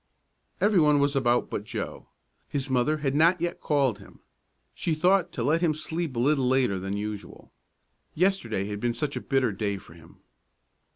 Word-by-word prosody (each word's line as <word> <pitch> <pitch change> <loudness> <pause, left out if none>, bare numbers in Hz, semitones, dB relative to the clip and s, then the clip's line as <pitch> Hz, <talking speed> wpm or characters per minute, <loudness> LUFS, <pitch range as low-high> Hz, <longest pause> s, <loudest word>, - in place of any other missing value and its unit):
Every 205 -3 +4
one 150 -2 +5
was 140 0 +1
about 120 -2 +1
but - - -3
Joe. - - -6 0.4
His 140 -1 -3
mother 130 +5 +2
had 135 - +1
not 165 +5 +4
yet 175 +1 -3
called 135 -8 +1
him. 100 - -16 0.5
She 165 - -1
thought 180 +2 +3
to 120 - -3
let 155 +6 +2
him 160 -4 +2
sleep 160 -2 -4
a - - -1
little 135 0 +2
later 125 -7 +2
than 95 +2 -3
usual. 105 0 -7 0.6
Yesterday 150 - +1
had 105 0 -5
been 120 +1 -1
such 145 +4 -3
a - - -3
bitter 135 -4 +1
day 100 0 -2
for 90 - -14
him! 85 0 -18
135 Hz, 180 wpm, -27 LUFS, 110-155 Hz, 0.6 s, one